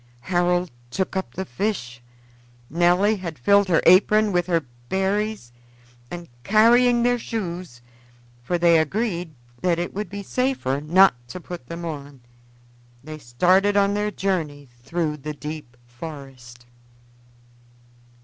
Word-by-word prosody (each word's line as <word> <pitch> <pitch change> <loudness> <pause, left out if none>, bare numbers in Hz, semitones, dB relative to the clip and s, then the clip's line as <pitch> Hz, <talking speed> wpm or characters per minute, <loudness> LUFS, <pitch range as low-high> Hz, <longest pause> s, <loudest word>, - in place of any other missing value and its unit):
Harold 175 +2 0 0.2
took 190 +10 -3
up 190 - -4
the 190 - -3
fish, 150 - -3 0.7
Nelly 180 +6 +3
had 170 -5 -6
filled 200 +10 +4
her 170 -3 +2
apron 210 +4 +5
with 175 -1 0
the 170 -3 0 0.2
berries, 195 - -1 0.6
and 175 -1 -7 0.2
carrying 235 - +4
their 245 0 +2
shoes 180 - -5 0.6
for 155 +9 -1
they 170 -1 +5
agreed 175 -1 -2 0.3
that 175 -2 +1
it 175 +1 -3
would 210 +2 -4
be 200 0 -6
safer 250 - -1
not 185 +4 +5
to 180 - -7
put 175 -7 -9
them 170 +3 -6
on 145 -4 -7 0.8
they 155 +1 -8
started 185 +11 +2
on 200 0 +3
their 210 +1 0
journey 160 -9 -3 0.2
through 160 0 -2
the 150 +2 -6
deep 150 -5 -8
forest. 120 -2 -11
175 Hz, 130 wpm, -23 LUFS, 150-200 Hz, 0.8 s, apron